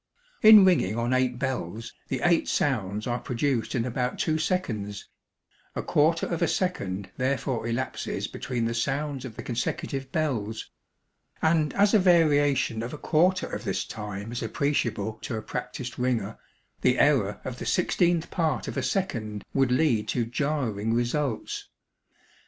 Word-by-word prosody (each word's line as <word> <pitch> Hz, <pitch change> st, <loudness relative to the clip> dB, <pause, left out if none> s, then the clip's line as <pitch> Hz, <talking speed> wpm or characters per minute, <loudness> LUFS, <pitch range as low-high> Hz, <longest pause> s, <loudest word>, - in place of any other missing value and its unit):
In 215 Hz, -2 st, +10 dB
ringing 135 Hz, -, +3 dB
on 120 Hz, +2 st, 0 dB
eight 130 Hz, -1 st, +1 dB
bells, 120 Hz, -5 st, -3 dB
the 130 Hz, -, -2 dB
eight 175 Hz, -1 st, +3 dB
sounds 105 Hz, -6 st, 0 dB
are 120 Hz, 0 st, -1 dB
produced 125 Hz, -1 st, -1 dB
in 115 Hz, -2 st, 0 dB
about 125 Hz, 0 st, -2 dB
two 155 Hz, 0 st, 0 dB
seconds; 110 Hz, -, -2 dB, 0.7 s
a -, -, -2 dB
quarter 160 Hz, +3 st, +2 dB
of 170 Hz, -, -3 dB
a -, -, +3 dB
second 100 Hz, -, -2 dB
therefore 130 Hz, -3 st, -1 dB
elapses 120 Hz, +3 st, -2 dB
between 120 Hz, -3 st, -3 dB
the 115 Hz, -, -1 dB
sounds 135 Hz, +3 st, -2 dB
of 115 Hz, -4 st, -8 dB
the -, -, -7 dB
consecutive 130 Hz, +2 st, -3 dB
bells; 115 Hz, -9 st, -2 dB, 0.7 s
and 160 Hz, -2 st, +2 dB
as 200 Hz, +1 st, +4 dB
a 215 Hz, -, +7 dB
variation 145 Hz, -9 st, +3 dB
of 115 Hz, +2 st, -5 dB
a -, -, -5 dB
quarter 180 Hz, +5 st, +2 dB
of -, -, -5 dB
this 95 Hz, -5 st, -2 dB
time 105 Hz, 0 st, -6 dB
is 120 Hz, -, -4 dB
appreciable 110 Hz, -7 st, -1 dB
to 120 Hz, -, -4 dB
a -, -, -4 dB
practised 125 Hz, 0 st, -5 dB
ringer, 120 Hz, -4 st, -1 dB, 0.4 s
the -, -, +3 dB
error -, -, +3 dB
of -, -, -5 dB
the -, -, -5 dB
sixteenth 170 Hz, -1 st, +1 dB
part 155 Hz, -, 0 dB
of -, -, -5 dB
a -, -, +1 dB
second 115 Hz, -, -2 dB
would 135 Hz, -2 st, +2 dB
lead 125 Hz, -5 st, +2 dB
to 120 Hz, -2 st, 0 dB
jarring 115 Hz, -4 st, -1 dB
results. 120 Hz, +1 st, -2 dB
130 Hz, 155 wpm, -27 LUFS, 115-150 Hz, 0.7 s, In